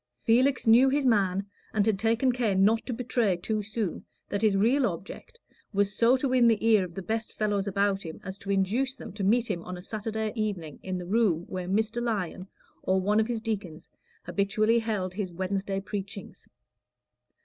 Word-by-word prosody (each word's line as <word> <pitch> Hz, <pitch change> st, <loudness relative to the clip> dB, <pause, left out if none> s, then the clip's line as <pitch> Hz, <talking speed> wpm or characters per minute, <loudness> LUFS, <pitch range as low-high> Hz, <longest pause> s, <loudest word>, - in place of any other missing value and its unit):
Felix 255 Hz, +4 st, +3 dB
knew 240 Hz, +4 st, +6 dB
his 280 Hz, +1 st, +1 dB
man, 195 Hz, -5 st, +2 dB, 0.3 s
and 205 Hz, -2 st, +3 dB
had 215 Hz, -3 st, +1 dB
taken 230 Hz, +4 st, +2 dB
care 240 Hz, -5 st, 0 dB
not 210 Hz, +4 st, +3 dB
to -, -, -2 dB
betray 235 Hz, -5 st, 0 dB
too 215 Hz, +4 st, -2 dB
soon 210 Hz, -3 st, -3 dB, 0.3 s
that 200 Hz, -, -2 dB
his 210 Hz, -3 st, +3 dB
real 240 Hz, +6 st, +3 dB
object 195 Hz, -, -8 dB, 0.3 s
was 200 Hz, +1 st, +1 dB
so 240 Hz, +3 st, +4 dB
to 275 Hz, -, -1 dB
win 250 Hz, -2 st, +4 dB
the 225 Hz, -1 st, +2 dB
ear 215 Hz, -4 st, +5 dB
of 175 Hz, -2 st, -8 dB
the 195 Hz, -, -5 dB
best 225 Hz, +2 st, -3 dB
fellows 205 Hz, -2 st, 0 dB
about 200 Hz, 0 st, +1 dB
him 160 Hz, -3 st, -8 dB
as 190 Hz, +1 st, -7 dB
to 200 Hz, -, -9 dB
induce 215 Hz, +8 st, +1 dB
them -, -, -9 dB
to 205 Hz, -1 st, -5 dB
meet 230 Hz, +5 st, +3 dB
him 195 Hz, -7 st, -3 dB
on 180 Hz, 0 st, -6 dB
a 180 Hz, -, -10 dB
Saturday 220 Hz, +1 st, -3 dB
evening 195 Hz, -9 st, -3 dB
in 185 Hz, -1 st, -3 dB
the 180 Hz, -, -6 dB
room 195 Hz, -4 st, +2 dB
where 185 Hz, -1 st, -5 dB
Mr. 220 Hz, +4 st, 0 dB
Lyon, 200 Hz, -5 st, -2 dB, 0.3 s
or 190 Hz, 0 st, +1 dB
one 205 Hz, +3 st, +2 dB
of 220 Hz, -, +2 dB
his 235 Hz, -2 st, -2 dB
deacons, 195 Hz, -8 st, -4 dB, 0.4 s
habitually 215 Hz, +3 st, +1 dB
held 210 Hz, -5 st, -2 dB
his 190 Hz, -2 st, -3 dB
Wednesday 195 Hz, +2 st, -2 dB
preachings. 200 Hz, 0 st, -7 dB
210 Hz, 195 wpm, -28 LUFS, 190-230 Hz, 0.4 s, knew